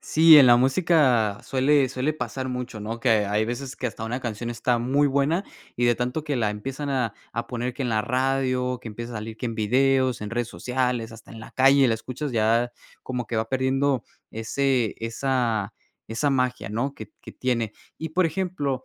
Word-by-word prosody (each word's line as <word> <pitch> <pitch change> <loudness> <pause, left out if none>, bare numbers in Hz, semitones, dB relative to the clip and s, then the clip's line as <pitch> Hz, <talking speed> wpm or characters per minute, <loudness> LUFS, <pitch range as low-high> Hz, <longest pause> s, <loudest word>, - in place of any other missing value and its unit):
Sí, 160 0 +7
en 135 - +8
la 120 0 +7
música 130 - +3
suele 135 0 +2
suele 130 +4 -1
pasar 130 -1 -4
mucho, 125 -3 -5
¿no? 115 +2 -4
Que 120 0 +2 0.2
hay 105 +2 +1
veces 125 +3 -5
que 125 - -2
hasta 110 -1 -5
una 120 +3 -3
canción 120 0 -4
está 120 +1 0
muy 135 +5 +2
buena 140 +7 +1 0.3
y 120 - +1
de 120 0 +4
tanto 125 +6 -3
que 145 -3 -1
la 110 -3 +1
empiezan 135 +7 -5
a 125 -5 -1 0.2
a 115 +1 -3
poner 125 0 -3
que 135 - -5
en 125 - -1
la 110 -1 +1
radio, 130 0 0
que 115 - -8
empieza 115 +3 -7
a - - -5
salir 110 +1 -6
que 125 - -4
en 115 - -4
videos, 130 +3 +2
en 105 - -5
redes 120 0 -2
sociales, 125 -3 -2
hasta 115 0 -14
en 115 - -10
la - - -11
calle, 135 +1 +5
la 115 - +2
escuchas 130 +5 -5
ya 115 +2 +2 0.3
como 125 -2 -4
que 115 - -3
va 110 0 -1
perdiendo 130 0 +1 0.3
ese 120 +1 0
esa 115 -3 -1 0.4
esa 125 +6 0
magia, 125 -4 0
¿no? 125 +6 -2
Que - - -9
t - - -37
que - - -11
tiene. 115 -4 -1 0.2
Y, 160 - -5
por 180 +1 +2
ejemplo, 155 -7 -2
125 Hz, 205 wpm, -25 LUFS, 115-135 Hz, 0.4 s, en